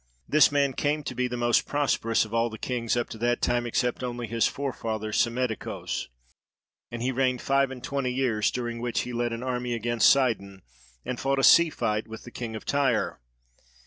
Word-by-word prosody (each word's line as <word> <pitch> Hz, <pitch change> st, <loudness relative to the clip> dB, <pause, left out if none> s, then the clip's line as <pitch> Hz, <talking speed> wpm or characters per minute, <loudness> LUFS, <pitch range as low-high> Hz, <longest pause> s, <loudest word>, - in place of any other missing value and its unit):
This 150 Hz, 0 st, +5 dB
man 140 Hz, -2 st, +2 dB
came 150 Hz, +3 st, -1 dB
to -, -, -4 dB
be 125 Hz, 0 st, 0 dB
the 125 Hz, 0 st, -4 dB
most 120 Hz, -1 st, +2 dB
prosperous 130 Hz, -6 st, +1 dB
of 110 Hz, -, -11 dB
all 115 Hz, 0 st, +2 dB
the 110 Hz, -, -8 dB
kings 120 Hz, -1 st, -1 dB
up 120 Hz, -, 0 dB
to 110 Hz, -, -8 dB
that 120 Hz, +1 st, +1 dB
time 120 Hz, 0 st, 0 dB
except 125 Hz, +2 st, -1 dB
only 120 Hz, -1 st, -3 dB
his 115 Hz, +1 st, +1 dB
forefather 110 Hz, -6 st, -4 dB
Psammetichos; 115 Hz, +1 st, -1 dB, 0.8 s
and 120 Hz, 0 st, -5 dB
he 130 Hz, -, +1 dB
reigned 130 Hz, -1 st, 0 dB
five 140 Hz, 0 st, +2 dB
and 130 Hz, -2 st, -9 dB
twenty 140 Hz, -2 st, -2 dB
years, 125 Hz, -5 st, +1 dB
during 120 Hz, -1 st, -4 dB
which 120 Hz, -1 st, -1 dB
he 125 Hz, -, -6 dB
led 120 Hz, 0 st, -1 dB
an 115 Hz, +1 st, -4 dB
army 125 Hz, -1 st, -2 dB
against 120 Hz, +1 st, +3 dB
Sidon 100 Hz, -8 st, +1 dB, 0.4 s
and 125 Hz, -, -4 dB
fought 135 Hz, 0 st, 0 dB
a 135 Hz, -, +1 dB
sea 170 Hz, +4 st, +7 dB
fight 105 Hz, -7 st, -2 dB
with 110 Hz, 0 st, -9 dB
the 120 Hz, -, -11 dB
king 115 Hz, -2 st, -5 dB
of 110 Hz, -, -8 dB
Tyre. 135 Hz, -7 st, +1 dB
120 Hz, 200 wpm, -27 LUFS, 115-130 Hz, 0.8 s, sea